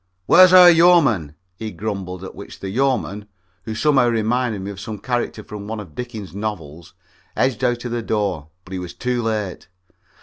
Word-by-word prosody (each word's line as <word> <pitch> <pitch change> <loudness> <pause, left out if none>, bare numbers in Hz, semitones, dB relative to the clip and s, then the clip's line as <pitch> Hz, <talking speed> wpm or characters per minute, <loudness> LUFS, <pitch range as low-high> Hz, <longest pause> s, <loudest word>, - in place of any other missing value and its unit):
"Where's 185 - +7
our 180 -1 +9
yeoman?" 155 - +4 0.2
he 110 +1 -5
grumbled, 95 -2 -5
at 95 - -8
which - - -11
the 95 - -5
yeoman, 115 -4 -1 0.4
who 110 - -5
somehow 135 0 +3
reminded 115 -2 0
me 100 - -5
of 100 - -10
some 110 +1 -6
character 120 -1 -3
from 105 -1 -9
one 110 0 -4
of 90 -8 -10
Dickens's 110 -7 -7
novels, 85 -6 -6 0.4
edged 130 0 0
out 120 -1 0
of 120 - -4
the 120 0 -2
door, 100 -9 -2 0.2
but 95 - -10
he 95 - -3
was 90 -1 -8
too 125 -1 -2
late. 105 -5 -3
110 Hz, 180 wpm, -20 LUFS, 95-125 Hz, 0.4 s, our